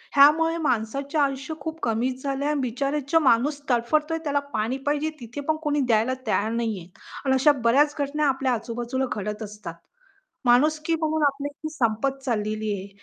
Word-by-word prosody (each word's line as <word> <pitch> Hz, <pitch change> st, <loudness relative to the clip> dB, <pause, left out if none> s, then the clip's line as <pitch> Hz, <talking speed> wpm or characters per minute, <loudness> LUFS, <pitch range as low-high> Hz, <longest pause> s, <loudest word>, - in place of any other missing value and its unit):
ह्यामुळे 315 Hz, +4 st, +6 dB
माणसाचे 275 Hz, +5 st, -1 dB
आयुष्य 275 Hz, 0 st, 0 dB
खूप 320 Hz, 0 st, -5 dB
कमीच 250 Hz, +3 st, -1 dB
झालं 275 Hz, 0 st, -2 dB
आहे 295 Hz, -, +1 dB
आणि 295 Hz, -2 st, 0 dB
बिचारे 275 Hz, +4 st, -1 dB
जो 325 Hz, -, +6 dB
माणूस 285 Hz, +1 st, +2 dB
तडफडतोय, 300 Hz, +7 st, +1 dB
त्याला 285 Hz, -2 st, +1 dB
पाणी 225 Hz, +5 st, -1 dB
पाहिजे 295 Hz, +2 st, +1 dB
तिथे 245 Hz, +4 st, -7 dB
पण 315 Hz, -, +2 dB
कोणी 295 Hz, -1 st, +1 dB
द्यायला 225 Hz, +3 st, +3 dB
तयार 215 Hz, 0 st, +1 dB
नाही 230 Hz, -2 st, -1 dB
आहे 170 Hz, -, -12 dB, 0.4 s
आणि 265 Hz, -, +3 dB
अशा 270 Hz, +3 st, +5 dB
बऱ्याच 285 Hz, +6 st, +4 dB
घटना 290 Hz, +1 st, 0 dB
आपल्या 265 Hz, -1 st, +1 dB
आजूबाजूला 240 Hz, +3 st, -2 dB
घडत 210 Hz, +2 st, -4 dB
असतात. 210 Hz, -5 st, -8 dB, 0.7 s
माणुसकी 305 Hz, +6 st, +3 dB
म्हणून 315 Hz, -1 st, 0 dB
आपली 280 Hz, +1 st, -3 dB
ती 310 Hz, -, -2 dB
संपत 270 Hz, +1 st, 0 dB
चाललेली 215 Hz, -3 st, -1 dB
आहे, 195 Hz, 0 st, -5 dB
270 Hz, 170 wpm, -25 LUFS, 230-295 Hz, 0.7 s, ह्यामुळे